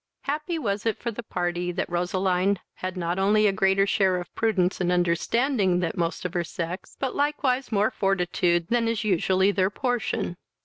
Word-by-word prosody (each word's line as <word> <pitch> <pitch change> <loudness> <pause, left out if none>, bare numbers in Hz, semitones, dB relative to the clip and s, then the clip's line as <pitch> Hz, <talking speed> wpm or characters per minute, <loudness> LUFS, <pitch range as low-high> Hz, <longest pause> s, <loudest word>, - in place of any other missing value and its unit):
Happy 300 +4 -2
was 205 -8 -2
it 220 - 0
for 235 - -3
the 230 - -6
party 175 -4 -2
that 180 +2 -2
Roseline 185 +2 +1 0.2
had 185 0 -4
not 175 +1 -1
only 210 +2 +4
a 205 - +5
greater 195 0 +3
share 190 -2 +2
of 175 - -9
prudence 190 -5 +1
and 180 0 +1
understanding 180 - +1
that 175 0 -2
most 170 -1 -2
of 180 - -3
her 175 - 0
sex, 170 +1 -6
but 265 -2 -2
likewise 280 -3 0
more 210 0 +2
fortitude 175 -3 +1
than 235 -1 +2
is 230 -1 -1
usually 190 0 +2
their 190 -1 +1
portion. 230 -6 -2
195 Hz, 180 wpm, -25 LUFS, 180-225 Hz, 0.2 s, a